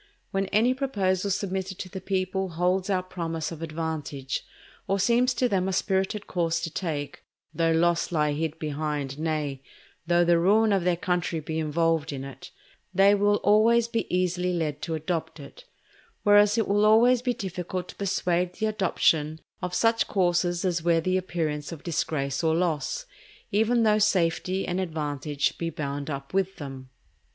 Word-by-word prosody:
When 195 Hz, 0 st, 0 dB
any 225 Hz, +6 st, +3 dB
proposal 200 Hz, -8 st, 0 dB
submitted 190 Hz, -1 st, -2 dB
to -, -, -6 dB
the 190 Hz, 0 st, -7 dB
people 190 Hz, 0 st, -1 dB
holds 180 Hz, +3 st, 0 dB
out 185 Hz, -1 st, -1 dB
promise 165 Hz, -3 st, -3 dB
of 165 Hz, -1 st, -8 dB
advantage, 155 Hz, -5 st, -4 dB, 0.4 s
or 195 Hz, +1 st, +1 dB
seems 240 Hz, +5 st, +3 dB
to 250 Hz, -, +2 dB
them 190 Hz, -4 st, 0 dB
a 190 Hz, -, -1 dB
spirited 190 Hz, +2 st, 0 dB
course 165 Hz, -2 st, 0 dB
to 165 Hz, -, -4 dB
take, 155 Hz, -5 st, -4 dB, 0.3 s
though 165 Hz, -1 st, +1 dB
loss 170 Hz, +1 st, +2 dB
lie 150 Hz, -3 st, +2 dB
hid 160 Hz, +1 st, -2 dB
behind, 150 Hz, -2 st, -3 dB
nay, 150 Hz, -4 st, -2 dB, 0.5 s
though 175 Hz, 0 st, +4 dB
the 170 Hz, 0 st, +4 dB
ruin 210 Hz, +4 st, +4 dB
of 195 Hz, -3 st, +1 dB
their 175 Hz, -1 st, +2 dB
country 175 Hz, -3 st, -1 dB
be 160 Hz, +1 st, -4 dB
involved 160 Hz, 0 st, 0 dB
in 135 Hz, -2 st, -5 dB
it, 135 Hz, -1 st, -10 dB, 0.4 s
they 195 Hz, +1 st, +5 dB
will 205 Hz, 0 st, +3 dB
always 225 Hz, +3 st, +4 dB
be 230 Hz, -1 st, -3 dB
easily 180 Hz, 0 st, 0 dB
led 155 Hz, -4 st, -2 dB
to 165 Hz, -1 st, -2 dB
adopt 160 Hz, +1 st, -3 dB
it; -, -, -12 dB, 0.6 s
whereas 205 Hz, +1 st, +5 dB
it 225 Hz, -, +1 dB
will 205 Hz, +1 st, +2 dB
always 235 Hz, +3 st, +5 dB
be 250 Hz, -1 st, -1 dB
difficult 180 Hz, -1 st, -4 dB
to -, -, -9 dB
persuade 180 Hz, -2 st, 0 dB
the 220 Hz, -, -2 dB
adoption 160 Hz, -7 st, +1 dB, 0.2 s
of 180 Hz, -1 st, -3 dB
such 225 Hz, 0 st, +2 dB
courses 175 Hz, -1 st, +1 dB
as 175 Hz, -2 st, 0 dB
wear 165 Hz, 0 st, +3 dB
the 185 Hz, +3 st, 0 dB
appearance 160 Hz, -5 st, -2 dB
of 165 Hz, -3 st, -8 dB
disgrace 150 Hz, -4 st, -2 dB
or 160 Hz, 0 st, +3 dB
loss, 175 Hz, -, -1 dB, 0.5 s
even 225 Hz, +3 st, +3 dB
though 215 Hz, -1 st, +4 dB
safety 185 Hz, -1 st, +1 dB
and 180 Hz, +1 st, -1 dB
advantage 150 Hz, -4 st, -2 dB
be 170 Hz, -, -1 dB
bound 145 Hz, -2 st, -4 dB
up 140 Hz, +1 st, -6 dB
with 195 Hz, 0 st, 0 dB
them. 135 Hz, -3 st, -8 dB
180 Hz, 170 wpm, -26 LUFS, 160-195 Hz, 0.6 s, they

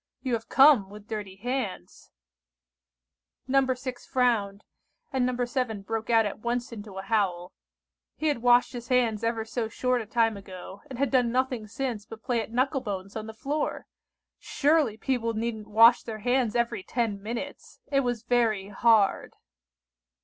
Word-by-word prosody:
You 255 Hz, -3 st, -1 dB
have 225 Hz, -1 st, -3 dB
come 265 Hz, -8 st, +6 dB
with 210 Hz, +1 st, -12 dB
dirty 210 Hz, -4 st, -5 dB
hands." 225 Hz, -, -5 dB, 1.4 s
No. 265 Hz, 0 st, +3 dB
6 255 Hz, -1 st, -5 dB
frowned, 220 Hz, -6 st, +1 dB, 0.5 s
and 255 Hz, -2 st, +2 dB
No. 250 Hz, -1 st, -1 dB
7 240 Hz, -5 st, -2 dB
broke 225 Hz, +2 st, -4 dB
out 225 Hz, -1 st, +5 dB
at 205 Hz, -, -4 dB
once 240 Hz, +2 st, -2 dB
into 205 Hz, -3 st, -9 dB
a 190 Hz, -, -5 dB
howl; 190 Hz, -4 st, 0 dB, 0.6 s
he 315 Hz, -, -5 dB
had 290 Hz, -6 st, +1 dB
washed 245 Hz, +1 st, +4 dB
his 240 Hz, -1 st, -7 dB
hands 240 Hz, -4 st, +1 dB
ever 230 Hz, -1 st, -1 dB
so 225 Hz, 0 st, -2 dB
short 250 Hz, +2 st, 0 dB
a 220 Hz, -, -8 dB
time 225 Hz, -1 st, +1 dB
ago, 190 Hz, 0 st, -10 dB
and 260 Hz, -, -7 dB
had 280 Hz, +1 st, 0 dB
done 250 Hz, -3 st, +3 dB
nothing 255 Hz, -3 st, -1 dB
since 225 Hz, -2 st, -4 dB
but 225 Hz, 0 st, -11 dB
play 240 Hz, -2 st, 0 dB
at 220 Hz, -, -8 dB
knuckle 260 Hz, +3 st, +1 dB
bones 200 Hz, -4 st, -5 dB
on 220 Hz, 0 st, -5 dB
the 220 Hz, -, -7 dB
floor! 290 Hz, +6 st, -2 dB, 0.5 s
Surely 290 Hz, -7 st, +1 dB
people 230 Hz, -2 st, -1 dB
needn't 220 Hz, -1 st, -3 dB
wash 230 Hz, +3 st, +6 dB
their 225 Hz, -2 st, -6 dB
hands 245 Hz, -3 st, +2 dB
every 235 Hz, -3 st, 0 dB
ten 215 Hz, -1 st, -2 dB
minutes! 235 Hz, +7 st, -6 dB
It 275 Hz, -, +3 dB
was 245 Hz, -4 st, -1 dB
very 230 Hz, -5 st, +1 dB
hard! 210 Hz, 0 st, +2 dB
230 Hz, 165 wpm, -27 LUFS, 215-250 Hz, 1.4 s, come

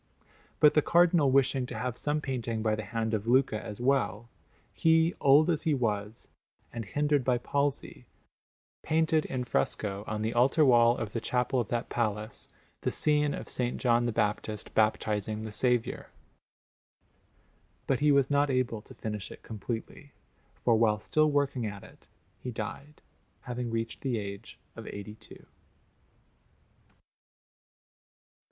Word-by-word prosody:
But 150 Hz, -1 st, +6 dB
the 150 Hz, -, +4 dB
Cardinal 170 Hz, -3 st, +4 dB
wishing 135 Hz, -1 st, +2 dB
to 120 Hz, -, -6 dB
have 125 Hz, +1 st, -3 dB
some 150 Hz, +3 st, -1 dB
painting 120 Hz, -5 st, -3 dB
by 110 Hz, -1 st, +1 dB
the 110 Hz, 0 st, -3 dB
hand 115 Hz, -1 st, -2 dB
of 110 Hz, 0 st, -2 dB
Luca 120 Hz, -3 st, +2 dB
as 105 Hz, +1 st, -7 dB
well, 120 Hz, -4 st, 0 dB, 0.4 s
he, 165 Hz, +1 st, +3 dB
old 145 Hz, +3 st, +6 dB
as 165 Hz, -4 st, +1 dB
he 160 Hz, -3 st, +1 dB
was, 105 Hz, -3 st, -3 dB, 0.4 s
and 115 Hz, -2 st, -5 dB
hindered 145 Hz, +4 st, +1 dB
by 125 Hz, 0 st, +2 dB
palsy, 140 Hz, +3 st, -2 dB, 0.7 s
painted 160 Hz, 0 st, +1 dB
in 130 Hz, -1 st, -3 dB
fresco, 100 Hz, -4 st, -2 dB
on 110 Hz, 0 st, -3 dB
the 110 Hz, -, -1 dB
altar 135 Hz, +6 st, +4 dB
wall 120 Hz, -2 st, +5 dB
of 110 Hz, -2 st, -5 dB
the 115 Hz, -, -2 dB
chapel 125 Hz, +2 st, 0 dB
of 120 Hz, -, -1 dB
that 120 Hz, +2 st, -3 dB
palace, 110 Hz, -1 st, -3 dB, 0.3 s
the -, -, 0 dB
scene 150 Hz, -1 st, +1 dB
of -, -, -7 dB
S. 125 Hz, -1 st, -2 dB
John 120 Hz, -1 st, +2 dB
the -, -, 0 dB
Baptist 105 Hz, -1 st, -2 dB
baptizing 110 Hz, 0 st, 0 dB
the 110 Hz, -, -6 dB
Saviour; 125 Hz, +1 st, 0 dB, 1.8 s
but 135 Hz, -, +1 dB
he 150 Hz, 0 st, +4 dB
was 140 Hz, -1 st, +3 dB
not 145 Hz, 0 st, +3 dB
able 125 Hz, -4 st, 0 dB
to -, -, -14 dB
finish 105 Hz, -3 st, -5 dB
it -, -, -12 dB
completely, 115 Hz, +5 st, -7 dB, 0.5 s
for 120 Hz, -, +5 dB
while 110 Hz, -2 st, +2 dB
still 155 Hz, +7 st, +2 dB
working 140 Hz, -5 st, 0 dB
at 100 Hz, -1 st, -7 dB
it -, -, -17 dB, 0.3 s
he 125 Hz, -, -6 dB
died, 135 Hz, +6 st, -7 dB, 0.4 s
having 125 Hz, -1 st, -4 dB
reached 115 Hz, 0 st, -3 dB
the 130 Hz, -4 st, -1 dB
age 100 Hz, -1 st, -7 dB, 0.2 s
of -, -, -9 dB
eighty 100 Hz, +1 st, -7 dB
two. 110 Hz, +1 st, -15 dB
120 Hz, 150 wpm, -29 LUFS, 110-140 Hz, 1.8 s, But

